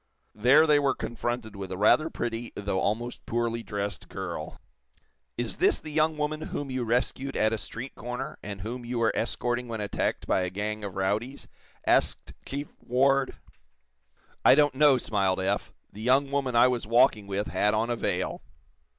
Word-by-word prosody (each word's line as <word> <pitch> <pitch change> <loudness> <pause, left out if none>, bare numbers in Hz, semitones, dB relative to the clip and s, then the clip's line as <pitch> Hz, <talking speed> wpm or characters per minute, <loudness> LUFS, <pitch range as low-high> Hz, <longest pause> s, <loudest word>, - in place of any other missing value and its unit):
There 130 +9 +5
they 150 -2 +5
were 140 -2 +1
confronted 120 -2 -4
with 95 -1 -6
a 95 - -3
rather 155 - +4
pretty 120 -3 -4
though 100 -2 -1
almost 120 +5 -2
poorly 115 0 -1
dressed 100 -4 -5
girl. - - -6 0.8
"Is - - -2
this - - +3
the 155 - -9
young 155 +1 +2
woman 150 +1 -2
whom 145 -3 -4
you 130 -1 -1
rescued 125 +3 -1
at 110 +1 +2
a 110 - -1
street 125 +6 -6
corner, 125 +5 -6
and 100 -2 -7
whom 120 +5 -5
you 120 +1 -4
were 115 -1 +3
escorting 120 +2 -1
when 115 -2 -4
attacked 105 -1 -2
by - - +2
a 90 - -1
gang 105 +3 -4
of 100 -2 -5
rowdies?" 105 +8 -2 0.4
asked - - +1
Chief 140 +2 -4
Ward. 135 +2 +2 1.1
"I - - +8
don't 145 -1 +4
know," 140 -1 +5
smiled 100 -6 0
Eph. 100 +2 -1 0.2
"The 105 - -9
young 135 +4 +3
woman 135 -3 0
I 120 +2 +7
was 125 -3 -1
walking 115 -3 +4
with 100 +1 -2
had 105 +1 +2
on 115 +2 0
a - - +1
veil." - - -2
120 Hz, 175 wpm, -27 LUFS, 105-135 Hz, 1.1 s, I